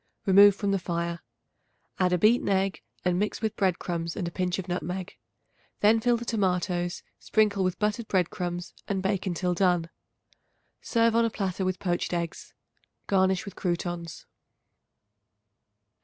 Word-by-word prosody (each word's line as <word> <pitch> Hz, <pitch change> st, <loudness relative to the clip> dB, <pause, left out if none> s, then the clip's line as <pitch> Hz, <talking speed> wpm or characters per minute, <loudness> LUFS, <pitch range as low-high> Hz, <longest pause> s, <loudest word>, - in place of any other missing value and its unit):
Remove 200 Hz, +1 st, +7 dB
from 200 Hz, 0 st, -1 dB
the 195 Hz, -, +1 dB
fire; 170 Hz, -1 st, -3 dB, 0.8 s
add 180 Hz, -1 st, +3 dB
a 180 Hz, -, +3 dB
beaten 215 Hz, +5 st, +3 dB
egg 195 Hz, 0 st, +1 dB, 0.2 s
and 180 Hz, 0 st, +2 dB
mix 210 Hz, +1 st, -1 dB
with 220 Hz, -1 st, -2 dB
bread 185 Hz, -3 st, +1 dB
crumbs 170 Hz, -2 st, -3 dB
and 175 Hz, -, -3 dB
a -, -, -4 dB
pinch 180 Hz, -1 st, -1 dB
of 190 Hz, -1 st, -5 dB
nutmeg. 180 Hz, +1 st, -4 dB, 0.7 s
Then 215 Hz, +2 st, +5 dB
fill 240 Hz, +1 st, +2 dB
the 235 Hz, -, -7 dB
tomatoes, 180 Hz, -4 st, -1 dB, 0.2 s
sprinkle 210 Hz, -3 st, +2 dB
with 185 Hz, -1 st, 0 dB
buttered 210 Hz, +2 st, -1 dB
bread 180 Hz, -3 st, +1 dB
crumbs 175 Hz, -1 st, -4 dB
and 195 Hz, -2 st, -2 dB
bake 195 Hz, -1 st, 0 dB
until 180 Hz, 0 st, 0 dB
done. 175 Hz, -2 st, +1 dB, 0.9 s
Serve 230 Hz, -1 st, +2 dB
on 230 Hz, -, +4 dB
a -, -, +1 dB
platter 195 Hz, -3 st, -2 dB
with 185 Hz, 0 st, -1 dB
poached 175 Hz, -1 st, -1 dB
eggs. 170 Hz, -1 st, -5 dB, 0.5 s
Garnish 190 Hz, -1 st, +2 dB
with 200 Hz, -3 st, -8 dB
croutons. 175 Hz, -2 st, -3 dB
185 Hz, 155 wpm, -27 LUFS, 175-200 Hz, 0.9 s, Remove